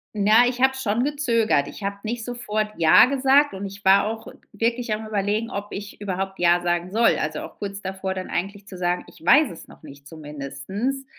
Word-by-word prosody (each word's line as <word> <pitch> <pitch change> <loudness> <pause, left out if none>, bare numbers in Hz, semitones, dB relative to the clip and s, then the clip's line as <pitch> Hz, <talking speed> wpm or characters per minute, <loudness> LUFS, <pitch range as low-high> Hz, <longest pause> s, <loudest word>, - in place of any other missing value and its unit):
Na, 215 +4 +5
ich 245 0 -2
habe 265 0 +4
schon 240 -1 0
gezögert. 230 - +1
Ich - - -11
habe 200 0 -3
nicht 230 +1 -4
sofort 215 -3 -3
ja 165 +5 +7
gesagt 275 +2 +3
und 195 +1 -6
ich 200 +1 -10
war 195 +1 +6
auch 225 +1 -6 0.2
wirklich 230 +1 -1
am 215 +1 -5
Überlegen, 210 +2 -1
ob 200 +1 -5
ich 200 +1 -8
überhaupt 195 -1 -3
ja 175 0 +4
sagen 175 +1 -1
soll. 230 +3 +3
Also 155 0 -3
auch - - -10
kurz 200 -1 -5
davor 190 0 -4
dann 185 0 -6
eigentlich 200 +3 -4
zu 190 - -9
sagen: 180 0 -1
„Ich - - -17
weiß 285 - +6
es 170 - -12
noch - - -17
nicht“, 140 -2 -13
zumindest. 155 - -5
205 Hz, 205 wpm, -23 LUFS, 185-230 Hz, 0.2 s, ja